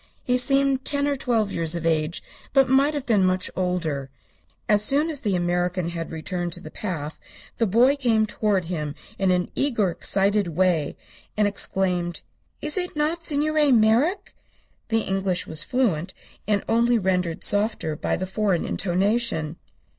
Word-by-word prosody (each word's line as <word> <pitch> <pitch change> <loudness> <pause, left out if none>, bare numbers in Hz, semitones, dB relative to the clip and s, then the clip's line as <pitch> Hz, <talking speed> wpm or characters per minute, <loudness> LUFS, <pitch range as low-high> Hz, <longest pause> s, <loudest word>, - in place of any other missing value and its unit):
He 250 - +1
seemed 275 +1 +3
ten 285 0 0
or 285 - +1
twelve 230 -6 0
years 165 0 0
of 170 -1 -4
age, 160 0 0 0.3
but 270 -1 +5
might 275 +3 +3
have 285 - -3
been 210 -5 +3
much 185 0 +1
older. 165 -7 -2 0.6
As 210 -1 +3
soon 290 +8 +1
as 285 -3 -3
the 205 -6 0
American 175 0 0
had 165 -1 -5
returned 175 +2 -4
to - - -3
the 155 - -10
path 160 -7 -5 0.4
the 230 - +2
boy 240 +8 +4
came 230 -5 +2
toward 210 -3 0
him 150 -4 -4 0.2
in 195 -1 +2
an 180 -1 +1
eager, 230 -10 +1
excited 200 +3 +1
way, 170 -2 0 0.4
and 210 -1 +3
exclaimed: 180 -3 -1 0.4
"Is 300 +4 +3
it 360 -2 -2
not 310 +3 0
Signor 300 -1 +2
Merrick?" 245 - +2 0.5
The 225 0 +1
English 190 -2 -1
was 155 -1 -1
fluent, 190 -9 -1 0.3
and 205 -2 +1
only 235 +1 +3
rendered 180 -4 -1
softer 205 -6 +1
by - - -1
the 185 - -3
foreign 190 -2 0
intonation. 190 -3 0
200 Hz, 160 wpm, -24 LUFS, 175-250 Hz, 0.6 s, but